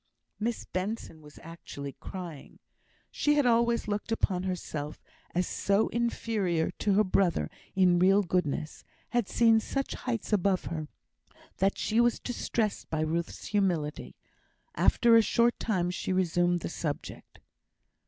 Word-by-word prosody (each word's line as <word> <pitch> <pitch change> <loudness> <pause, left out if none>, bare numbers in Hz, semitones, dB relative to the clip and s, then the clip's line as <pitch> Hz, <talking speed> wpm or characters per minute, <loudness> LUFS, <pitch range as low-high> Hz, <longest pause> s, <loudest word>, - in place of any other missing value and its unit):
Miss 230 +2 -2
Benson 185 -4 -4
was 150 -1 -15
actually 150 -4 -8
crying. 175 -6 -8 0.5
She 295 0 +2
had 290 -2 +3
always 235 -1 +2
looked 210 +2 -3
upon 190 -5 +1
herself 160 -5 -4 0.4
as 180 0 +1
so 200 +2 +1
inferior 215 -8 0
to 205 - +2
her 210 +2 +5
brother 185 -2 +1 0.2
in 180 -2 +4
real 195 +3 +5
goodness; 165 -4 -2 0.3
had 240 -4 0
seen 225 -1 +5
such 275 +5 -3
heights 230 -3 -3
above 195 -2 +2
her, 155 -2 -4 0.7
that 195 +1 +1
she 225 +2 +2
was 240 -1 +2
distressed 230 -3 -2
by 160 -1 -1
Ruth's 165 +2 -2
humility. 175 -8 -1 0.6
After 235 -1 +4
a 225 - +8
short 235 +2 +2
time 180 -5 0
she 180 - -3
resumed 175 -1 +2
the - - -4
subject. 155 -3 -5
190 Hz, 135 wpm, -29 LUFS, 170-225 Hz, 0.7 s, a